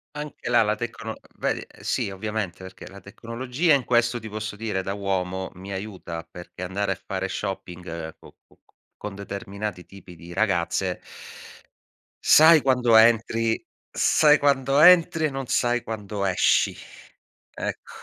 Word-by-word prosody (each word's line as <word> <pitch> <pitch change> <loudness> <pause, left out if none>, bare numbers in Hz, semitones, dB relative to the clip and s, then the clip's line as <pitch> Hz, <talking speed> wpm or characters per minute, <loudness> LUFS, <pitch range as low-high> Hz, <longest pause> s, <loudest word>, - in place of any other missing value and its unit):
Anche 150 -4 -7
la 120 - +5
la 105 -1 +1
tecno 115 0 -6 0.2
vedi? - - -1 0.2
Sì 100 - -1
ovviamente, 105 -2 -4
perché 95 0 -11
la 100 +1 -12
tecnologia 125 - -1
in 140 -2 +2
questo, 120 0 +1
ti 110 0 -9
posso 105 0 -5
dire, 105 -3 -3
da 95 - -3
uomo 95 -2 -2
mi 95 +2 -9
aiuta 95 -4 -6
perché 85 +2 -12
andare 95 +2 -2
a 95 - -4
fare 95 0 -3
shopping 90 -4 -6
co - - -16
co - - -26 0.4
con 105 -2 -7
determinati 100 -1 -6
tipi 95 -3 -14
di 85 +2 -12
ragazze 95 -2 0 1.2
sai 160 0 +8
quando 125 -4 +3
entri 115 0 +4 0.3
sai 150 -1 +4
quando 140 -1 +2
entri, 170 0 +6
e - - +1
non 135 -1 -5
sai 120 0 +1
quando 105 -3 -5
esci. 95 -2 +3 0.8
Ecc - - -5
105 Hz, 145 wpm, -24 LUFS, 95-120 Hz, 1.2 s, sai